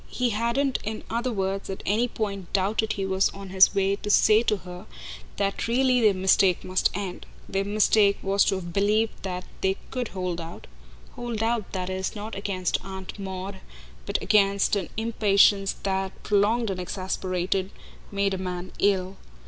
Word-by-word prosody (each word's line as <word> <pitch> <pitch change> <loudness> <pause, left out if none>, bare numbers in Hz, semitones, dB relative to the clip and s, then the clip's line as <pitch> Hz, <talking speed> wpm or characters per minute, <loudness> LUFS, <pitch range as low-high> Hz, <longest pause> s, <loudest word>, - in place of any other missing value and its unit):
He 250 -1 0
hadn't 235 +5 0
in 215 +1 -4
other 240 +2 -1
words 195 -2 -2
at 190 - -6
any 225 +5 +2
point 200 -6 -4
doubted 210 +3 +1
he 195 - -3
was 190 0 +2
on 195 -1 -8
his 190 +1 +5
way 195 0 +2
to 210 - -6
say 215 +1 +5
to 215 -3 +1
her 180 +2 -10 0.5
that 200 +2 -1
really 250 +1 +3
their 210 -3 +4
mistake 185 -1 +3
must 185 0 +1
end. 195 -2 -5 0.2
Their 195 0 -1
mistake 205 0 +3
was 195 +1 +3
to - - +2
have 175 -2 -6
believed 210 +3 +1
that 180 -1 -4 0.2
they 190 0 +1
COULD 250 -2 -2
hold 180 -3 -3
out 165 +1 -9 0.5
hold 235 -2 -4
out, 230 -3 -1
that 185 -1 -3
is, 190 +2 -3
not 215 +2 -6
against 195 -2 -2
Aunt 190 +1 -8
Maud, 190 0 -5 0.5
but 200 - 0
against 200 -1 +3
an 195 -4 -2
impatience 205 -3 +3
that, 190 -1 -2
prolonged 210 +2 +2
and 185 - -4
exasperated, 185 0 -2 0.4
made 200 -1 0
a 190 - -3
man 180 -1 -5
ill. 190 -1 +1
195 Hz, 170 wpm, -26 LUFS, 190-215 Hz, 0.5 s, his